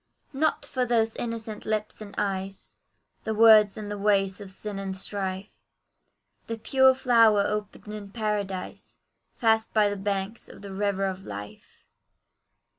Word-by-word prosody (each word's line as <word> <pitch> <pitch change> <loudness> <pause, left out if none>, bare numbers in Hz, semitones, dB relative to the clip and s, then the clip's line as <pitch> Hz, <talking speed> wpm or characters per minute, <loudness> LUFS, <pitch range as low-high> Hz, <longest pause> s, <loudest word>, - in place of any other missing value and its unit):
Not 310 +3 0
for 255 - -1
those 225 -2 +1
innocent 225 -2 -4
lips 215 0 -3
and 205 -1 -9
eyes, 195 -1 -3 0.5
The 220 - -2
words 215 -2 +7
and 210 -1 -6
the 205 - -4
ways 195 -1 +1
of 200 - -8
sin 195 +1 -5
and 190 -1 -4
strife; 190 0 -4 1.0
The 230 - -4
pure 265 +3 +4
flower 230 -5 +5
opened 210 0 -4
in 205 -2 -7
paradise, 205 -3 -4 0.4
Fast 225 -1 +1
by 210 -1 +5
the 205 - -3
banks 200 +2 -3
of - - -13
the 200 -1 -7
river 195 0 0
of 190 0 -4
life. 105 - -10
210 Hz, 145 wpm, -26 LUFS, 195-220 Hz, 1.0 s, words